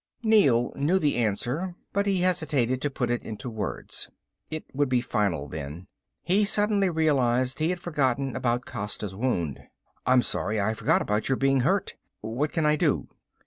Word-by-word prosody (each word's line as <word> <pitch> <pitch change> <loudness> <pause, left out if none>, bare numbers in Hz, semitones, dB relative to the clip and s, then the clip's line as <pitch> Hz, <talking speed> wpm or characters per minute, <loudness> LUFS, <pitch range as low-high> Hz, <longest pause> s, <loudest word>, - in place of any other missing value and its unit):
Neel 140 - +4
knew 155 +7 +2
the 150 -6 +1
answer, 120 - -1 0.2
but 200 +1 +1
he 195 -2 +2
hesitated 150 -9 +1
to 145 - 0
put 125 -3 -2
it 120 - 0
into 110 +3 -6
words. 110 -2 -5 0.4
It 155 0 -5
would 145 0 +1
be 125 -1 +3
final 100 - -1
then. 75 +4 -7 0.4
He 195 +4 +3
suddenly 205 -1 +2
realized 130 -6 +1
he 155 +2 +2
had 180 0 -1
forgotten 135 -6 0
about 125 0 0
Costa's 105 -4 -4
wound. 95 - -1 0.5
"I'm 125 -1 +5
sorry... 110 0 -1
I 105 +2 +1
forgot - - +2
about 105 +4 -1
your 135 - +3
being 135 0 +2
hurt. 185 +10 0 0.2
What 120 +8 -2
can 160 - 0
I 150 0 +3
do?" - - +1
130 Hz, 170 wpm, -26 LUFS, 115-160 Hz, 0.5 s, I'm